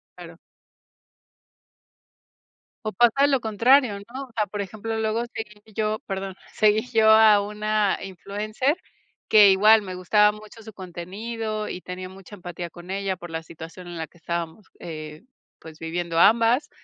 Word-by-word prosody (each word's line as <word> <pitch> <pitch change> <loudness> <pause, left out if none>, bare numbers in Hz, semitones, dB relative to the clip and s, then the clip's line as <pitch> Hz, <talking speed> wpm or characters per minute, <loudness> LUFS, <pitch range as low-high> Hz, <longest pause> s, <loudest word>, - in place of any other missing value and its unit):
Claro. - - -12 2.5
O 215 - -2
pasa 240 +7 +4
lo 275 -2 +2
contrario, 230 +1 +3
¿no?, 240 +7 -8
o 250 - -21
sea, 210 - +2
por 205 +1 -4
ejemplo, 220 +3 -5
luego 220 +1 0
seguí 210 -2 -7
yo 215 0 -1
perdón, 195 -1 -5 0.2
seguí 215 +2 +2
yo 220 -1 +5
a 220 -1 +7
una 210 0 0
influencer 210 - -2 0.5
que 210 -2 +7
igual 215 +3 +6
me 185 -2 -7
gustaba 210 +3 +4
mucho 215 +1 -13
su 220 0 -11
contenido 210 +5 -5
y 180 - -6
tenía 185 0 -7
mucha 195 +2 -12
empatía 175 -2 -7
con 175 +2 -11
ella 195 -1 -2
por 175 -1 -10
la 160 - -3
situación 165 +2 -11
en 175 - -7
la 160 - -3
que 175 - -24
estábamos, 170 +4 -5
eh, 155 0 -8 0.4
pues, 160 -1 -13
viviendo 165 0 -2
ambas, 230 - +4
205 Hz, 155 wpm, -24 LUFS, 180-220 Hz, 2.5 s, a